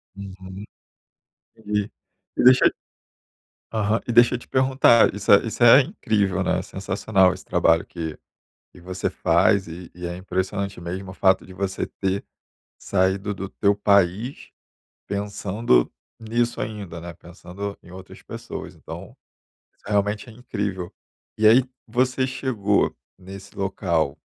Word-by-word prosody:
Uhum. 95 0 -9 1.7
E - - +1
deixa 130 0 +7 1.0
Aham 110 +1 +1
e - - -1
deixa 120 +1 +6
eu - - -4
te - - -16
perguntar, 130 -4 +4
isso 100 0 -6
é 100 - +7
isso 115 - -6
é 125 +4 +9
incrível, 105 - -1
né, 90 -1 +1
é - - -3
sensacional 95 0 +1
esse 95 - -11
trabalho 85 -2 +2
que 80 -3 -6 0.6
que 90 - -16
você 90 +1 -3
faz 100 -3 +2
e 85 +1 -9
e 90 0 -6
é 85 - -5
impressionante 95 +1 -3
mesmo 95 +2 -6
o - - -10
fato 95 -1 +3
de 95 - -13
você 95 0 -3
ter 95 0 -3 0.5
saído 95 +2 0
do 95 0 -6
teu 100 0 +1
país, 100 +4 +1 0.6
pensando 100 - 0 0.3
nisso 120 +2 -1
ainda, 100 -6 -5
né, 85 +1 -8
pensando 90 +4 -8
em 90 - -16
outras 95 0 -12
pessoas. - - -8
Então, - - -10 0.6
isso - - -36
realmente 105 +2 0
é 115 - -11
incrível. 100 -7 -4 0.5
E 110 - +4
aí 120 +4 +7 0.2
você 130 +1 +1
chegou 125 -6 0 0.2
nesse 95 +1 -11
local, 85 -7 -1
100 Hz, 140 wpm, -23 LUFS, 95-110 Hz, 1.7 s, é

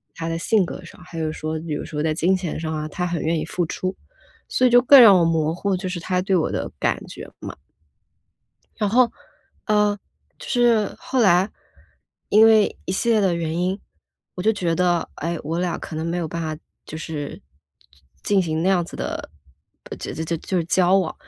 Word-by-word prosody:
他 165 0 -5
的 165 - -2
性 205 0 +2
格 175 - -8
上， 170 - -14
还 165 -2 -7
是 155 -1 -1
说 155 0 -4
比 160 -1 -5
如 - - -5
说 150 -1 -4
在 160 - +1
金 180 +4 +2
钱 180 -4 -4
上 160 -1 -3
啊， 155 0 -3
他 180 +4 -3
很 170 -2 -2
愿 160 0 0
意 - - -3
付 175 - -2
出。 185 +2 -3 0.5
所 255 - +2
以 - - +3
就 245 0 +7
更 270 +2 +8
让 200 -5 +8
我 - - +3
模 160 -1 +1
糊， 195 0 -1
就 185 - -5
是 180 -1 -4
他 180 +2 -1
对 195 -1 +1
我 165 - +1
的 - - -3
感 - - -1
觉 - - -9
嘛。 - - -8 1.2
然 210 - +1
后， 240 0 +4 0.6
嗯， 210 -1 +2 0.4
就 - - -10
是 235 -4 +2
后 260 -2 -1
来， 190 -1 +4 0.8
因 215 +2 +6
为 220 -2 +4
一 185 - -3
系 235 +5 -1
列 220 -2 +4
的 185 -3 +2
原 165 -1 -2
因， 185 +2 -1 0.6
我 180 - -5
就 220 +2 +3
觉 175 -5 -1
得， 175 -1 +1
哎， 165 +1 -3
我 165 +2 -3
俩 180 -1 -1
可 155 - -7
能 160 +1 -3
没 175 +1 -2
有 165 - -3
办 170 +2 -4
法 155 -1 -3 0.3
就 155 - -8
是 150 -3 -6 0.8
进 200 -2 +2
行 160 -1 -2
那 185 - +2
样 180 -3 +2
子 - - -12
的 - - -5 0.7
就 - - -6
就 160 +1 -3
就 180 +3 -2
是 165 - -1
交 185 +1 +3
往， 175 -4 -2
175 Hz, 230 characters per minute, -22 LUFS, 165-200 Hz, 1.2 s, 更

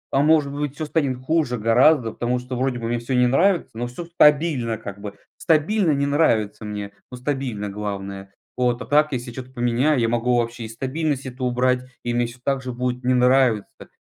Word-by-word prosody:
А, 135 - +4
может 150 -2 +3
быть, 145 -1 -3
всё 155 - -4
станет 145 -4 0
хуже 130 -2 0
гораздо, 115 +3 +4
потому 120 +2 -1
что 125 +1 -6
вроде 130 0 -1
бы 115 -1 -4
мне 120 +1 -1
всё 120 +3 -3
не 125 0 +4
нравится, 170 +9 +2
но 120 +2 -4
всё 145 +8 -7
стабильно 150 -8 +3
как 100 -1 -9
бы. 105 -1 -7 0.2
Стабильно 165 +4 +2
не 140 -1 +1
нравится 115 -8 +1
мне, 105 -1 -5 0.2
но 125 - -7
стабильно, 125 -5 -3
главное, 100 -1 -6 0.2
вот. 125 -1 +1
А - - -11
так, 150 +2 +3
если 120 -2 -4
я - - -13
чё-то 130 +1 -8
поменяю, 125 +3 +1
я 115 - +2
могу 120 +1 +1
вообще 115 0 -2
и - - -6
стабильность 135 +4 -2
эту 130 0 -5
убрать, 125 0 +1 0.2
и 120 - -2
мне 120 0 +1
всё 120 +2 -11
так 135 -1 0
же 125 -1 -5
будет 125 +1 -3
не 125 +1 +2
нравиться. 125 -4 +2
125 Hz, 210 wpm, -22 LUFS, 120-140 Hz, 0.2 s, А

